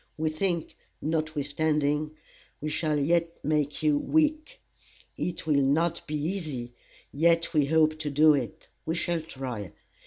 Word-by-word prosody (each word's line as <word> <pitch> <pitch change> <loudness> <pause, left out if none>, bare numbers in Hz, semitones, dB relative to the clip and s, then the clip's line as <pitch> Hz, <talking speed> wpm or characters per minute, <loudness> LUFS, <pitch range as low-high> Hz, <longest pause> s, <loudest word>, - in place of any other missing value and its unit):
We 155 0 0
think, 170 +1 -2 0.2
notwithstanding, 150 -1 0 0.4
we 155 - -3
shall 155 0 0
yet 165 +3 +1
make 150 0 0
you 150 -2 +3
weak. 310 - +1 0.6
It 175 - -3
will 145 -3 +3
not 160 +5 +2
be 155 - -3
easy, 150 -7 -3 0.4
yet 170 +3 +2
we 150 -3 +3
hope 155 0 +3
to 150 -1 -2
do 150 +2 +6
it. 145 +3 -3 0.2
We 160 - -2
shall 170 -1 -1
try. 130 - -6
155 Hz, 135 wpm, -28 LUFS, 145-165 Hz, 0.6 s, do